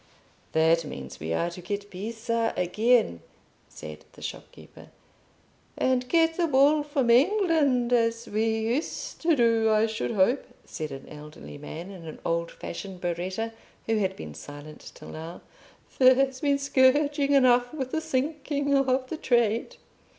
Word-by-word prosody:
"That 160 +1 +3
means 65 - -8
we 80 +2 -4
are 170 - 0
to 180 - -9
get 200 +3 -5
Pisa 225 +4 -2
again," 195 - +2 0.5
said 75 0 -10
the - - -13
shopkeeper. - - -10 0.9
"And 255 -1 +1
get 325 -1 +3
the 345 -2 +2
wool 290 +2 +4
from 280 -5 0
England 285 - +3
as 230 0 +1
we 215 +2 0
used 240 +8 -3
to 330 -1 +3
do, 230 -3 +3
I 215 0 +4
should 220 +1 -3
hope," 230 +5 +2 0.2
said 155 -2 -6
an 135 0 -9
elderly 150 -1 -11
man, 165 +5 -8
in 175 -4 -10
an 155 - -8
old 170 0 0
fashioned 190 +1 -8
berretta, 185 +6 -3 0.3
who 225 -1 +1
had 190 -2 0
been 75 -1 -8
silent 145 - -11
till - - -11
now. 165 +2 -8 0.6
"There's 260 0 +4
been 285 -1 +2
scourging 280 +1 +3
enough 245 -2 +4
with 265 -4 -4
the 320 - -1
sinking 285 -1 -1
of 265 -1 +2
the 320 - -5
trade." 235 -5 +1
230 Hz, 150 wpm, -26 LUFS, 180-275 Hz, 0.9 s, wool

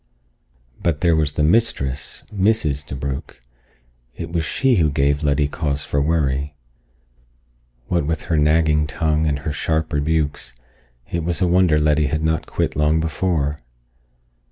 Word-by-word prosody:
But 80 -4 0
there 85 -2 +3
was 75 -2 +1
the 75 - 0
mistress, 70 - 0
Mrs. 95 -9 +1
DeBrugh! 65 0 -5 0.8
It 85 -1 -6
was 85 -1 0
she 130 - +1
who 80 -3 +3
gave 70 0 +1
Letty 75 -1 +1
cause 75 -1 -2
for 70 - 0
worry. 70 -2 0 1.3
What 85 -5 0
with 80 0 -2
her 80 - 0
nagging 75 0 +3
tongue 80 0 0
and 70 -2 0
her 75 - -1
sharp 80 +2 -1
rebukes, 75 -3 -1 0.6
it 85 -1 -1
was 85 -1 -1
a - - +2
wonder 90 -3 +3
Letty 75 0 +2
had 75 +2 -2
not 80 0 0
quit - - -2
long 75 +2 +2
before. 80 -2 -1
75 Hz, 145 wpm, -21 LUFS, 70-80 Hz, 1.3 s, there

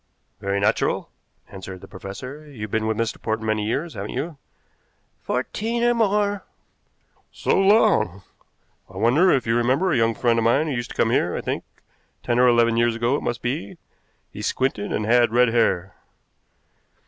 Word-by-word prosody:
"Very 100 0 -1
natural," 100 - 0 0.4
answered 95 -1 -9
the - - -11
professor. 125 +10 -9
"You've 105 -7 -7
been 110 0 0
with 110 -1 -1
Mr. 115 -1 -2
Portman 110 0 -2
many 110 -1 0
years, 150 +8 -2
haven't 100 +2 -6
you?" 150 +4 -4 0.8
"Fourteen 225 - -2
or 240 0 +4
more." 205 -3 +1 0.9
"So - - 0
long! 195 - +3 0.7
I 95 - -12
wonder 125 - +4
if 135 -8 +2
you 115 - +1
remember 130 +10 +2
a 145 - +2
young 115 -1 +2
friend 115 0 +2
of - - 0
mine 125 +7 +3
who 150 - -2
used 120 -1 -3
to - - -10
come 115 - +2
here, 90 -8 +1
I - - -3
think. - - -3 0.6
Ten 120 0 0
or 125 - +6
eleven 115 -1 +3
years 120 -1 +2
ago 120 +4 +1
it - - -2
must 120 -1 -3
be. 145 +8 -3 0.6
He - - -7
squinted 130 -6 -1
and 105 - -1
had 120 0 +4
red 125 0 +4
hair." 95 -6 +1
120 Hz, 175 wpm, -23 LUFS, 110-145 Hz, 0.9 s, or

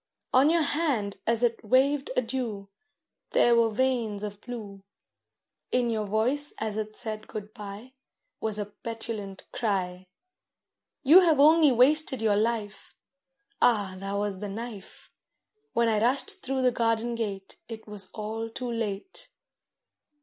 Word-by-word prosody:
On 265 +4 +6
your 335 0 +3
hand 280 -10 0
as 230 +1 +2
it 235 -1 +1
waved 270 +5 +2
adieu 230 -5 -2 0.6
There 240 - +5
were 230 -1 +4
veins 225 -3 0
of 205 0 -6
blue; 215 -5 -8 0.9
In 245 -2 +1
your 215 -2 -2
voice 250 +8 0
as 220 -1 -3
it 215 0 -4
said 215 -2 -5
good 215 0 -7
bye 210 +5 -9 0.5
Was 220 -1 -2
a 210 - -2
petulant 210 -1 -6
cry, 185 -4 -2 1.0
'You 310 +7 +9
have 330 -6 +3
only 310 0 +6
wasted 265 +2 +4
your 215 -2 +2
life.' 215 -1 -2 0.7
(Ah, 205 -6 +3
that 195 +1 -4
was 200 -1 -2
the 205 0 -5
knife!) 215 -1 -8 0.6
When 235 0 +2
I 215 -2 +2
rushed 255 +4 +1
through 265 0 -1
the 250 - +4
garden 230 0 0
gate 200 -4 -5
It 220 -1 -8
was 205 -2 -6
all 220 +1 -5
too 245 +2 -5
late. 230 - -5
225 Hz, 140 wpm, -27 LUFS, 205-255 Hz, 1.0 s, You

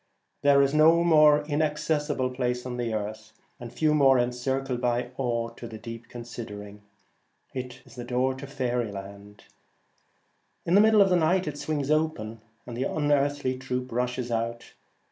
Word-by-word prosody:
There 140 -1 +5
is 140 +1 +1
no 160 +2 +5
more 150 -3 +5
inaccessible 150 -3 0
place 125 -1 -1
upon 125 0 -6
the 120 -2 -2
earth, 110 0 -5 0.3
and 120 -1 -8
few 155 -1 +1
more 135 -3 +5
en 120 0 +1
circled 130 0 -2
by 120 0 0
awe 120 -3 -1
to 115 +1 -10
the 110 - -8
deep 115 +1 -9
considering. 105 -4 -8 0.7
It 125 -1 -6
is 130 - -16
the 120 - -7
door 125 +2 0
of 135 +1 -9
faery 125 -5 -1
land. 100 +1 -10 1.2
In 170 - 0
the 200 - +7
middle 215 -1 +6
of 195 - 0
night 180 +2 +3
it 145 -1 -4
swings 150 -2 -2
open, 120 -9 -1 0.2
and 120 - -7
the 125 - -1
unearthly 145 -3 0
troop 125 -1 -4
rushes 125 0 -2
out. 115 +1 -3
125 Hz, 165 wpm, -27 LUFS, 120-145 Hz, 1.2 s, the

